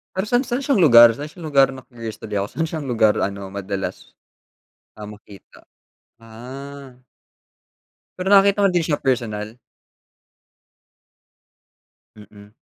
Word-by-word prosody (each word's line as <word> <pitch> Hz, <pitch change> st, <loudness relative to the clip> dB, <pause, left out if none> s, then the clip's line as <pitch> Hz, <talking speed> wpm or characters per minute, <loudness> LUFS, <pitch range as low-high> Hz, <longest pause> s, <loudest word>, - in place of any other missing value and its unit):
Pero 190 Hz, +3 st, -2 dB
san 245 Hz, +3 st, +1 dB
san 245 Hz, +3 st, -3 dB
siyang 275 Hz, -1 st, 0 dB
lugar? 120 Hz, -4 st, +8 dB
San 145 Hz, -, -6 dB
siyang 160 Hz, +2 st, -10 dB
lugar 135 Hz, -2 st, +4 dB
na-curious 120 Hz, -4 st, -10 dB
tuloy 105 Hz, -2 st, -6 dB
ako 100 Hz, +1 st, -2 dB
san 165 Hz, -, -2 dB
siyang 155 Hz, -3 st, -5 dB
lugar 110 Hz, -4 st, +2 dB
ano 100 Hz, -1 st, -3 dB
madalas? 100 Hz, 0 st, -6 dB, 0.8 s
Ah, 105 Hz, -1 st, -10 dB
makita. 105 Hz, -2 st, -16 dB, 0.6 s
Ah. 130 Hz, +4 st, -11 dB, 1.2 s
Pero 185 Hz, -, -3 dB
nakita 200 Hz, +1 st, +5 dB
ko 195 Hz, -, +5 dB
din 175 Hz, -3 st, 0 dB
siya 150 Hz, -3 st, -2 dB
personal. 115 Hz, -4 st, -2 dB, 2.6 s
Mm. 105 Hz, 0 st, -16 dB
125 Hz, 125 wpm, -21 LUFS, 105-160 Hz, 2.6 s, lugar